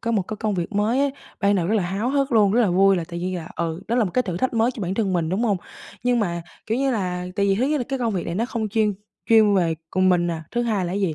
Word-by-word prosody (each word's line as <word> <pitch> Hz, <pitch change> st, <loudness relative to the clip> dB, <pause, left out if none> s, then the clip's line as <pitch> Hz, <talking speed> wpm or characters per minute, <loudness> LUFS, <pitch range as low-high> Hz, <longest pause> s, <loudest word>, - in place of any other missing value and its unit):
có 230 Hz, -, -2 dB
một 215 Hz, -4 st, +2 dB
cái 215 Hz, +4 st, -6 dB
công 210 Hz, -1 st, -1 dB
việc 175 Hz, +3 st, -3 dB
mới 210 Hz, +5 st, +1 dB
ấy, 280 Hz, -1 st, +1 dB, 0.3 s
ban 200 Hz, 0 st, +3 dB
đầu 175 Hz, -3 st, +1 dB
rất 215 Hz, -, +1 dB
là 205 Hz, -, +2 dB
háo 195 Hz, +7 st, -2 dB
hức 275 Hz, -2 st, 0 dB
luôn, 205 Hz, -3 st, +4 dB
rất 240 Hz, -, +3 dB
là 205 Hz, -6 st, +3 dB
vui 195 Hz, +1 st, +4 dB
là 170 Hz, -, -2 dB
tự 170 Hz, -, -6 dB
nhiên 180 Hz, +1 st, -2 dB
là, 165 Hz, -1 st, -7 dB
ừ, 165 Hz, +1 st, -2 dB
đó 235 Hz, -, +1 dB
là 235 Hz, -, +3 dB
một 180 Hz, -, -3 dB
cái 255 Hz, -, +3 dB
thử 180 Hz, -7 st, -4 dB
thách 255 Hz, +4 st, -1 dB
mới 230 Hz, +2 st, +3 dB
cho 215 Hz, -, -6 dB
bản 185 Hz, +1 st, -2 dB
thân 200 Hz, -3 st, 0 dB
mình, 165 Hz, -3 st, 0 dB
đúng 190 Hz, +6 st, -1 dB
hông? 205 Hz, -4 st, +2 dB, 0.5 s
Nhưng 245 Hz, -1 st, +2 dB
mà 170 Hz, -4 st, -2 dB, 0.2 s
kiểu 225 Hz, +3 st, 0 dB
như 275 Hz, 0 st, +1 dB
là 180 Hz, -5 st, -2 dB
tại 200 Hz, 0 st, +2 dB
vì 195 Hz, -, +3 dB
thứ 245 Hz, +6 st, +1 dB
nhất 300 Hz, +1 st, +1 dB
là 245 Hz, -, -2 dB
cái 270 Hz, -1 st, -2 dB
công 230 Hz, -3 st, 0 dB
việc 180 Hz, -, -2 dB
này 170 Hz, -, -3 dB
nó 225 Hz, -, 0 dB
không 230 Hz, -3 st, -3 dB
chuyên 215 Hz, -1 st, +1 dB, 0.3 s
chuyên 215 Hz, -3 st, +6 dB
về 170 Hz, -4 st, +2 dB, 0.2 s
cùng 185 Hz, 0 st, +2 dB
mình 175 Hz, -1 st, +3 dB
nè. 165 Hz, -2 st, -2 dB
Thứ 240 Hz, 0 st, 0 dB
hai 210 Hz, -6 st, 0 dB
là 175 Hz, -, -3 dB
gì? 190 Hz, -5 st, 0 dB
205 Hz, 330 wpm, -23 LUFS, 180-230 Hz, 0.5 s, chuyên